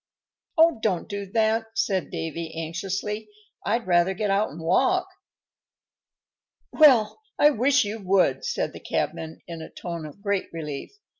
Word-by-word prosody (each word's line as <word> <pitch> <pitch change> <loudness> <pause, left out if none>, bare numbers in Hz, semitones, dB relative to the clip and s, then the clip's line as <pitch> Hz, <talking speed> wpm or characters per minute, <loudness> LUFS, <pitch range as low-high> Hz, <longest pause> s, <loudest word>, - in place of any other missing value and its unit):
"Oh! 325 -5 +5
don't 190 -6 0
do 200 -2 -5
that," 225 +2 +1
said 195 -4 0
Davy, 165 0 -5
anxiously. 195 +6 -3 0.3
"I'd 230 +3 0
rather 175 +1 +3
get 205 +1 -1
out 200 +2 +2
and 155 - -10
walk." 265 - +2 1.7
"Well, 270 - +5 0.2
I 295 - +6
wish 260 0 +3
you 215 +2 -4
would," 190 -1 +2
said 480 0 -2
the - - -9
cabman, 160 0 -3
in 165 -2 -7
a 160 - -8
tone 170 -3 -6
of 200 +7 -14
great 200 -2 -1
relief. 150 -4 -6
200 Hz, 145 wpm, -25 LUFS, 170-225 Hz, 1.7 s, I